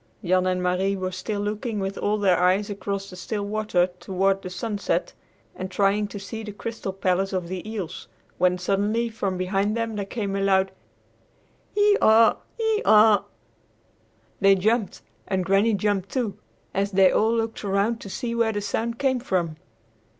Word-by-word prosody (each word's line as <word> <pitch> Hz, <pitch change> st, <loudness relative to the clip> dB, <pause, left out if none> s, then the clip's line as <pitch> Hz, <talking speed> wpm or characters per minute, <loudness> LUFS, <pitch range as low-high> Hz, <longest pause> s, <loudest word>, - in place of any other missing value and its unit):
Jan 185 Hz, +1 st, +2 dB
and 180 Hz, 0 st, 0 dB
Marie 185 Hz, +2 st, +1 dB
were 185 Hz, -1 st, -3 dB
still 200 Hz, +3 st, -3 dB
looking 210 Hz, +2 st, -3 dB
with 195 Hz, 0 st, -3 dB
all 210 Hz, +1 st, 0 dB
their 190 Hz, -4 st, +3 dB
eyes 190 Hz, +3 st, +2 dB
across 200 Hz, -1 st, -4 dB
the -, -, -9 dB
still 205 Hz, +3 st, -4 dB
water 210 Hz, -4 st, +1 dB
toward 195 Hz, +1 st, 0 dB
the 185 Hz, -, -6 dB
sunset 200 Hz, +3 st, -2 dB, 0.4 s
and 185 Hz, 0 st, -5 dB
trying 200 Hz, +2 st, +1 dB
to 205 Hz, -, -8 dB
see 220 Hz, +3 st, -6 dB
the 215 Hz, -1 st, -6 dB
crystal 215 Hz, -1 st, -5 dB
palace 190 Hz, 0 st, 0 dB
of 180 Hz, -2 st, -2 dB
the 185 Hz, +3 st, -5 dB
eels, 195 Hz, -6 st, -5 dB, 0.3 s
when 180 Hz, 0 st, +3 dB
suddenly 205 Hz, +5 st, 0 dB
from 200 Hz, -4 st, -3 dB
behind 195 Hz, +4 st, 0 dB
them 230 Hz, -1 st, -2 dB
there 200 Hz, -1 st, -3 dB
came 200 Hz, -3 st, -3 dB
a 195 Hz, -, -1 dB
loud 190 Hz, -1 st, +2 dB, 1.0 s
"Hee 415 Hz, 0 st, +4 dB
haw, 220 Hz, 0 st, +6 dB, 0.2 s
hee 445 Hz, -1 st, +1 dB
haw." 215 Hz, -1 st, +6 dB, 1.1 s
They 195 Hz, 0 st, +6 dB
jumped, 215 Hz, +3 st, 0 dB, 0.2 s
and 185 Hz, -2 st, -1 dB
Granny 200 Hz, +4 st, +3 dB
jumped, 200 Hz, -2 st, 0 dB
too, 235 Hz, -7 st, -1 dB, 0.4 s
and 195 Hz, +1 st, +1 dB
they 195 Hz, -2 st, +4 dB
all 220 Hz, +1 st, +2 dB
looked 225 Hz, -1 st, -2 dB
around 205 Hz, +4 st, 0 dB
to 200 Hz, -, -8 dB
see 235 Hz, +4 st, -3 dB
where 230 Hz, -1 st, +1 dB
the 205 Hz, -, -1 dB
sound 230 Hz, +3 st, -2 dB
came 260 Hz, -1 st, +1 dB
from. 175 Hz, -9 st, -1 dB
200 Hz, 170 wpm, -24 LUFS, 190-220 Hz, 1.1 s, haw